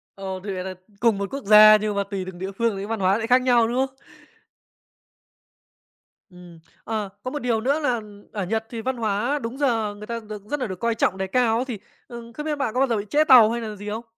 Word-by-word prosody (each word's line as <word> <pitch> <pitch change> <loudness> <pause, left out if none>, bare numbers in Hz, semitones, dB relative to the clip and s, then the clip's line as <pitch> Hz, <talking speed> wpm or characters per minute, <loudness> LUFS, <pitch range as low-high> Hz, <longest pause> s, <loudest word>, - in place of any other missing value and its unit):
Ồ, 190 -1 -6
thì 200 - -4
vậy 185 0 -4
đ - - -6 0.3
cùng 230 -4 +3
một 200 -1 -3
quốc 275 -4 -5
gia 215 +1 +9
nhưng 210 -1 -2
mà 200 - 0
tùy 195 -2 -3
từng 180 -2 -9
địa 190 +1 -5
phương 230 -3 +1
thì 195 - -5
văn 225 0 -4
hóa 190 +3 +2
sẽ 225 - -2
khác 250 +2 +4
nhau, 240 -3 +3
đúng 260 +3 +1
không? 265 0 -21 2.3
Ừm, 175 -2 -14 0.3
ờ, 215 -3 -3
có 255 - -4
một 295 - -3
điều 235 -4 0
nữa 275 +6 +1
là 250 -6 0 0.3
ở 205 -3 -3
Nhật 220 +2 -1
thì 230 -2 -5
văn 260 +1 -2
hóa 230 +6 -1
đúng 235 +4 -5
giờ 225 -7 0
người 210 +1 -10
ta 235 0 -4
được 210 -2 -7
rất 295 -1 -2
nà 250 - -1
được 185 -3 -7
coi 230 -1 0
trọng 190 -3 0
đề 190 - -2
cao 230 +2 +2
á, 250 - -1
thì, 225 -5 -4 0.3
ừm, 235 -1 -10
không 300 +5 -7
biết 300 -1 -1
bạn 255 -6 -2
có 255 - +1
bao 270 - +4
giờ 230 - +1
bị 205 - -3
trễ 305 +1 +4
tàu 245 -6 +7
hay 235 +1 -2
nà 215 -2 -5
gì 205 +1 -8
không? 225 +3 -4
225 Hz, 265 wpm, -23 LUFS, 205-250 Hz, 2.3 s, gia